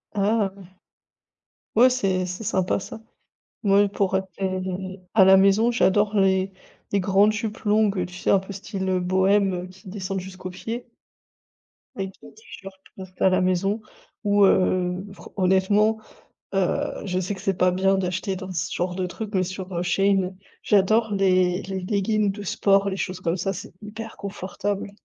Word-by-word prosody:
Ah 205 Hz, 0 st, +1 dB
ouais 195 Hz, -, -13 dB, 1.1 s
ouais, 250 Hz, +3 st, +6 dB
c'est 190 Hz, -7 st, 0 dB
c'est 180 Hz, +5 st, -6 dB
sympa, 190 Hz, 0 st, 0 dB
ça. 220 Hz, -, -9 dB, 0.6 s
Mouais, 200 Hz, 0 st, +4 dB
pour 195 Hz, -1 st, -1 dB
rester 190 Hz, 0 st, -3 dB
à 195 Hz, -3 st, +6 dB
la 190 Hz, 0 st, +8 dB
maison, 200 Hz, +4 st, +4 dB
j'adore 210 Hz, -1 st, +2 dB
les, 190 Hz, 0 st, +2 dB, 0.4 s
les 200 Hz, -, +3 dB
grandes 200 Hz, +3 st, +4 dB
jupes 215 Hz, 0 st, -3 dB
longues, 210 Hz, -1 st, +3 dB
heu, 180 Hz, -, 0 dB
tu 180 Hz, -, -12 dB
sais, -, -, -3 dB
un 195 Hz, -, +5 dB
peu 190 Hz, +1 st, -9 dB
style 190 Hz, -1 st, -2 dB
bohème, 190 Hz, +2 st, +2 dB
heu, 180 Hz, 0 st, -4 dB
qui 185 Hz, +1 st, -14 dB
descendent 195 Hz, -1 st, -4 dB
jusqu'aux 185 Hz, 0 st, -8 dB
pieds. 230 Hz, +6 st, -6 dB, 1.1 s
Avec 190 Hz, -1 st, -4 dB
des -, -, -14 dB
t-shirts 195 Hz, -, -12 dB, 0.2 s
pour 190 Hz, -, -8 dB
rester 185 Hz, 0 st, -7 dB
à 190 Hz, -, +6 dB
la 185 Hz, 0 st, +2 dB
maison 190 Hz, +4 st, +1 dB, 0.4 s
ou 205 Hz, -1 st, +4 dB
heu, 185 Hz, 0 st, +2 dB
fran -, -, -13 dB
honnêtement, 200 Hz, +3 st, +3 dB, 0.5 s
heu, 190 Hz, -2 st, -1 dB
je 185 Hz, -1 st, -1 dB
sais 185 Hz, +3 st, -2 dB
que 190 Hz, -, -9 dB
c'est 195 Hz, -2 st, -1 dB
pas 180 Hz, 0 st, +3 dB
bien 195 Hz, +1 st, +2 dB
d'acheter 185 Hz, +1 st, -2 dB
dans 185 Hz, 0 st, -7 dB
ce 170 Hz, 0 st, -2 dB
genre 180 Hz, 0 st, -2 dB
de 185 Hz, -1 st, -1 dB
truc 215 Hz, +3 st, -6 dB
mais 185 Hz, -1 st, +2 dB
sur, 185 Hz, 0 st, -6 dB
heu, 170 Hz, -, -1 dB
Shein, 190 Hz, 0 st, +1 dB, 0.3 s
j'adore 210 Hz, +2 st, +3 dB
les 185 Hz, -1 st, +2 dB
les 190 Hz, -1 st, -4 dB
leggins 205 Hz, +2 st, 0 dB
de 205 Hz, +1 st, -5 dB
sport, 200 Hz, +1 st, +2 dB
les 190 Hz, -, -4 dB
choses 185 Hz, -1 st, -4 dB
comme 170 Hz, +1 st, 0 dB
ça, 195 Hz, +2 st, -1 dB
c'est 180 Hz, -2 st, -9 dB
hyper 220 Hz, +2 st, -8 dB
confortable. 200 Hz, +1 st, -4 dB
190 Hz, 175 wpm, -24 LUFS, 185-205 Hz, 1.1 s, la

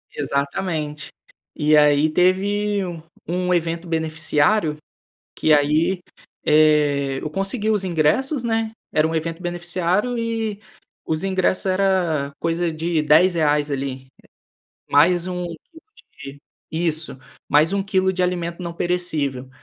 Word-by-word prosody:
Exatamente. 150 Hz, +2 st, -3 dB, 0.5 s
E 150 Hz, -1 st, +3 dB
aí 150 Hz, +1 st, +4 dB
teve 200 Hz, +4 st, +1 dB
um 170 Hz, -3 st, -6 dB, 0.3 s
um 180 Hz, 0 st, 0 dB
evento 170 Hz, 0 st, -1 dB
beneficiário, 160 Hz, +1 st, +1 dB, 0.6 s
que 155 Hz, -, +2 dB
aí, 155 Hz, +5 st, +2 dB, 0.4 s
eh, 150 Hz, -3 st, +3 dB
eu 155 Hz, -, -4 dB
consegui 195 Hz, +6 st, -1 dB
os 210 Hz, -3 st, +1 dB
ingressos, 185 Hz, -, +1 dB
né. 225 Hz, -1 st, -1 dB, 0.2 s
Era 155 Hz, 0 st, +3 dB
um 165 Hz, -, -3 dB
evento 165 Hz, +2 st, -3 dB
beneficiário 175 Hz, +6 st, -1 dB
e 225 Hz, -2 st, -3 dB, 0.4 s
os 160 Hz, +1 st, -2 dB
ingressos 190 Hz, 0 st, 0 dB
era 185 Hz, -7 st, +1 dB
coisa 165 Hz, +1 st, 0 dB
de 160 Hz, 0 st, -1 dB
R$10 150 Hz, -2 st, +3 dB
ali, 135 Hz, -1 st, -4 dB, 0.8 s
mais 170 Hz, +4 st, +4 dB
1 180 Hz, -1 st, -3 dB
quilo 175 Hz, -, -11 dB, 0.4 s
de 135 Hz, +1 st, -9 dB, 0.3 s
isso, 160 Hz, -1 st, -2 dB, 0.3 s
mais 155 Hz, +5 st, +3 dB
1 200 Hz, -1 st, 0 dB
quilo 190 Hz, -1 st, +1 dB
de 185 Hz, -1 st, -1 dB
alimento 175 Hz, -1 st, -2 dB
não 170 Hz, -1 st, -5 dB
perecível. 155 Hz, -8 st, -2 dB
170 Hz, 120 wpm, -21 LUFS, 150-190 Hz, 0.8 s, aí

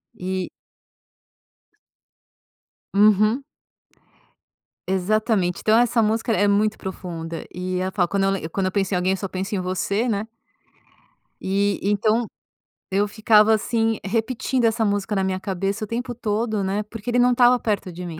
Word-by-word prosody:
E 185 Hz, 0 st, -3 dB, 2.4 s
Uhum. 215 Hz, +5 st, +4 dB, 1.4 s
Exatamente, 190 Hz, 0 st, 0 dB
então 220 Hz, +1 st, +4 dB
essa 240 Hz, -1 st, +3 dB
música 225 Hz, +2 st, 0 dB
é 205 Hz, -1 st, +2 dB
muito 210 Hz, +1 st, +2 dB
profunda 170 Hz, -3 st, -6 dB
e 180 Hz, 0 st, -3 dB
ela 185 Hz, +1 st, -1 dB
fala 185 Hz, -1 st, +1 dB
quando 195 Hz, +2 st, -1 dB
eu -, -, +2 dB
lem 180 Hz, -5 st, -3 dB
quando 190 Hz, +3 st, -2 dB
eu 185 Hz, -, 0 dB
penso 195 Hz, 0 st, -1 dB
em -, -, +2 dB
alguém 180 Hz, +1 st, +1 dB
eu 195 Hz, -, -2 dB
só 195 Hz, -, -5 dB
penso 190 Hz, +3 st, -3 dB
em 190 Hz, -, -1 dB
você, 200 Hz, +6 st, -1 dB
né. 210 Hz, 0 st, -1 dB, 1.1 s
E 200 Hz, +1 st, 0 dB
então 215 Hz, +3 st, +1 dB, 0.7 s
eu 200 Hz, +2 st, +2 dB
ficava 215 Hz, 0 st, +4 dB
assim, 225 Hz, 0 st, 0 dB
repetindo 235 Hz, +4 st, -1 dB
essa 225 Hz, 0 st, +2 dB
música 205 Hz, +1 st, -1 dB
na 195 Hz, -, +1 dB
minha 185 Hz, 0 st, -1 dB
cabeça 195 Hz, +3 st, -3 dB
o 215 Hz, -, -4 dB
tempo 240 Hz, +1 st, -4 dB
todo, 215 Hz, -2 st, -1 dB
né, 195 Hz, +2 st, -1 dB
porque 215 Hz, +2 st, -8 dB
ele 245 Hz, -, +2 dB
não 245 Hz, 0 st, +5 dB
estava 245 Hz, 0 st, +5 dB
perto 205 Hz, -4 st, -2 dB
de 180 Hz, +1 st, -7 dB
mim. 165 Hz, -2 st, -7 dB
205 Hz, 160 wpm, -22 LUFS, 190-225 Hz, 2.4 s, não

